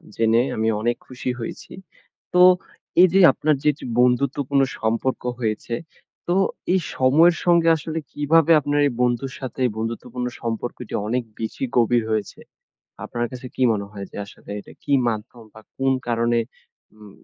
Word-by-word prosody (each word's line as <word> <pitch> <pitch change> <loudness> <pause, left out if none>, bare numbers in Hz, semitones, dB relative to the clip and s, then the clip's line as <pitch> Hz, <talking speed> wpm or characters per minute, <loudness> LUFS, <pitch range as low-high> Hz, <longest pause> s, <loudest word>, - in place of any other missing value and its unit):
জেনে, 115 +1 +3
আমি 110 0 0
অনেক 120 +1 +1
খুশি 130 0 -5
হয়েছি। 115 - -7 0.6
তো 180 - +5 0.6
এইযে, 185 +1 +5
আপনার 150 +3 +1
যে - - 0
এইযে 145 - -11
বন্ধুত্বপূর্ণ 135 +2 +2 0.2
সম্পর্ক 115 +4 -1 0.2
হয়েছে, 115 0 -2 0.5
তো 175 - +1 0.4
এই 190 - +3 0.2
সময়ের 155 +7 +5
সঙ্গে 170 -1 +4
আসলে 160 +1 -4
কিভাবে 160 +2 +3
আপনার 145 +1 0
এই - - -1
বন্ধুর 125 +2 0
সাথে 130 -1 -6 0.2
বন্ধুত্বপূর্ণ 115 +2 -4
সম্পর্কটি 115 +1 -5
অনেক 125 +3 0 0.2
বেশি 110 +3 -4
গভীর 120 0 +3
হয়েছে? 110 -2 -2 0.7
আপনার 120 0 -2
কাছে 130 0 -8
কি 130 - -2
মনে 100 -2 -3
হয়, 100 -1 -7
যে - - -10
আসলে 100 - -14
এটা - - -15
কি - - -3 0.2
মাধ্যম 115 +1 -5
বা, 110 - -12 0.2
কোন 135 0 +2 0.2
কারণে 120 0 +1 0.6
উম 105 -1 -14
125 Hz, 150 wpm, -22 LUFS, 115-140 Hz, 0.7 s, তো